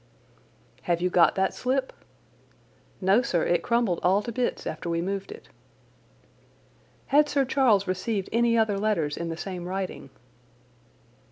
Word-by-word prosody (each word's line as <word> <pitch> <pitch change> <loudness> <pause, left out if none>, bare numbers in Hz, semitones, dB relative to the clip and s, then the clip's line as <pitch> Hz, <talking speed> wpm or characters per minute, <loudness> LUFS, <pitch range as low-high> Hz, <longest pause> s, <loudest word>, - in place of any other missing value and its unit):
"Have 170 -1 0
you 180 +1 0
got 175 -1 +4
that 190 0 +1
slip?" 260 +1 -1 1.1
"No, 195 +5 +4
sir, 175 -9 0
it 175 -1 +1
crumbled 235 -6 0
all 195 +3 +2
to 235 - -5
bits 245 +2 -2
after 160 +2 -5
we 165 0 0
moved 195 - -3
it." 440 - -11 1.7
"Had 295 +1 +5
Sir 280 -2 +1
Charles 245 -7 +3
received 190 +2 -2
any 235 0 +2
other 215 -3 +1
letters 180 -9 0
in 170 0 -4
the 165 - -5
same 180 -1 -6
writing?" 185 -6 -5
195 Hz, 145 wpm, -26 LUFS, 175-235 Hz, 1.7 s, Had